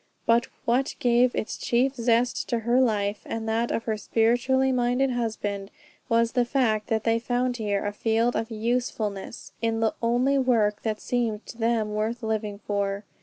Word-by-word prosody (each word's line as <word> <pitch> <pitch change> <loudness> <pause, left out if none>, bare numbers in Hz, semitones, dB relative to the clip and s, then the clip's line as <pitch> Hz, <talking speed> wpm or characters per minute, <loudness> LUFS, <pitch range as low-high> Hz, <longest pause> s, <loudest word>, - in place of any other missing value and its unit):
But 230 +1 +3 0.2
what 250 +3 +1
gave 245 0 +3
its 215 - -3
chief 255 +3 +1
zest 240 -1 +1
to 235 -1 0
her 240 +3 +3
life 210 -4 0
and 225 0 -4
that 230 +2 0
of 225 - -1
her 220 -2 -1
spiritually 245 +5 +2
minded 250 +1 +1
husband, 210 -4 -3 0.4
was 230 0 +3
the 245 -1 +2
fact 235 -4 0
that 220 -1 0
they 230 0 +2
found 245 +1 -1
here 205 -3 -1
a 205 - -2
field 225 +3 +1
of 225 - -2
usefulness 225 -2 -3
in 225 -1 0
the 225 -1 +1
only 245 +4 +2
work 220 -5 +2
that 215 -2 -2
seemed 230 -3 -2
to - - -10
them 225 -2 +1
worth 225 +3 -2
living 215 -2 -2
for. 200 0 -1
230 Hz, 170 wpm, -26 LUFS, 215-245 Hz, 0.4 s, But